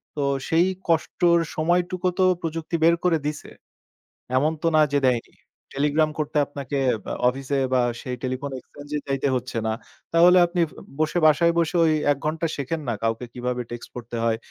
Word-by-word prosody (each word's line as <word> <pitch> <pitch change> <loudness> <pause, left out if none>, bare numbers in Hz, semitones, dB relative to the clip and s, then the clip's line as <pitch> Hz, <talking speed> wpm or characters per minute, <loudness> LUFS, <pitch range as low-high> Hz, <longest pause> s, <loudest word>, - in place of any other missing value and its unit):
তো 145 - -1 0.2
সেই 165 +2 +3 0.2
কষ্টের 170 +1 +3 0.2
সময়টুকু 175 +3 0
তো 185 - +5 0.2
প্রযুক্তি 165 +1 -3
বের 170 +1 +6
করে 170 -3 +3
দিছে। 150 0 -4 0.9
এমন 150 +4 +2
তো 165 - +1
না 155 - +6
যে 145 - +4
দেয়নি। 120 -2 -1 0.4
টেলিগ্রাম 150 +2 +1
করতে 155 0 -2
আপনাকে 140 0 -5 0.3
আ - - -2 0.2
অফিসে 135 +2 -3 0.2
বা 125 - +4 0.2
সেই 125 -3 -4
টেলিফোন 130 +2 -3
এক্সচেঞ্জ 145 +3 -13
এ - - -2
যাইতে 135 0 0
হচ্ছে 125 -1 -3
না। 110 - +1 0.4
তাহলে 175 +2 +7
আপনি 175 0 -1 0.4
বসে 155 +3 +1
বাসায় 170 +2 +5
বসে 165 +1 0
ওই 155 - +3 0.2
১ 140 - 0
ঘন্টা 160 +2 0
শেখেন 150 +3 -3
না - - +1
কাউকে 115 +2 -1
কিভাবে 125 0 -3
টেক্সট 120 - -7
পড়তে 120 -1 -6
হয়, 115 -1 +1
150 Hz, 175 wpm, -24 LUFS, 130-165 Hz, 0.9 s, তাহলে